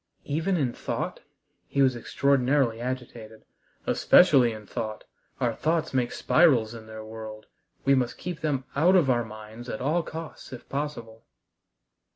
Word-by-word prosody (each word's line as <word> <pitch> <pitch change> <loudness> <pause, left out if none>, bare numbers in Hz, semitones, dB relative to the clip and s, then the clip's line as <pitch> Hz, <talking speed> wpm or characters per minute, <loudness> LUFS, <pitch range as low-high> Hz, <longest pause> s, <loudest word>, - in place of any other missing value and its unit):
"Even 165 +6 0
in 130 -6 0
thought?" - - -4 0.5
He 140 - +2
was 130 -2 +3
extraordinarily 130 -1 +1
agitated. 120 -3 -6 0.4
"Especially 140 -10 +5
in 110 -1 -8
thought. 110 +1 -5 0.4
Our 120 -2 +1
thoughts 160 +6 -1
make 125 -2 +1
spirals 130 -10 +3
in 110 -1 -10
their 110 0 -8
world. 110 -1 -8 0.4
We 140 - +5
must 125 -3 +1
keep 180 -3 -5
them 145 -4 0
out 170 +7 +4
of 155 -8 +4
our 120 -1 +2
minds 110 +2 -10
at 110 - -4
all 155 +6 +1
costs 160 -2 -8
if 125 - -10
possible." 120 -6 -5
125 Hz, 150 wpm, -27 LUFS, 110-145 Hz, 0.5 s, Especially